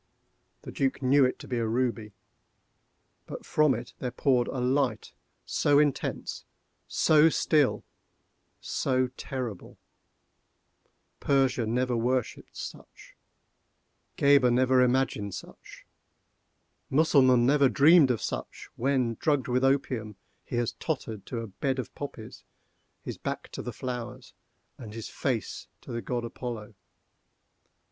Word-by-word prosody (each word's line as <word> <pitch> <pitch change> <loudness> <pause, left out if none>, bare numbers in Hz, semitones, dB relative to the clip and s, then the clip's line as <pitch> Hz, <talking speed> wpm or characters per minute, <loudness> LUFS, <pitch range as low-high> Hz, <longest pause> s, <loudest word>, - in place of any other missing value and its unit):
The - - -8
Duc 135 0 -1
knew 135 +2 +5
it 130 - -1
to - - -11
be 125 -2 -2
a 115 - 0
ruby; 115 -2 -1 1.1
but - - -8
from 150 -4 +3
it 120 +1 -8
there 125 - -2
poured 125 -1 +1
a - - -4
light 130 +1 0 0.3
so 145 - +2
intense, 145 -2 -1 0.4
so 155 +1 +4
still, 150 -3 +2 0.8
so 130 -1 0
terrible, 125 -6 -6 1.4
Persia 135 -4 +1
never 125 +2 0
worshipped 125 +1 -2
such—Gheber 140 -3 -2
never 130 +1 +4
imagined 125 -6 +1
such—Mussulman 130 -5 -1
never 140 0 +4
dreamed 155 +1 +6
of 120 -3 -1
such - - -5
when, 125 -3 0
drugged 145 -4 +1
with 125 +1 +1
opium, 130 -6 0 0.3
he - - -6
has 120 -1 0
tottered 110 - -4
to 115 - -4
a 115 - -6
bed 130 +7 -2
of 130 - -5
poppies, 115 -6 -8 0.6
his - - -6
back - - -5
to - - -6
the - - -5
flowers, 125 -3 -6 0.5
and 110 -3 -9
his 115 - -6
face 125 -6 -3
to - - -10
the 115 0 -3
God 120 -1 -3
Apollo. 115 -2 -6
125 Hz, 120 wpm, -28 LUFS, 120-135 Hz, 1.4 s, dreamed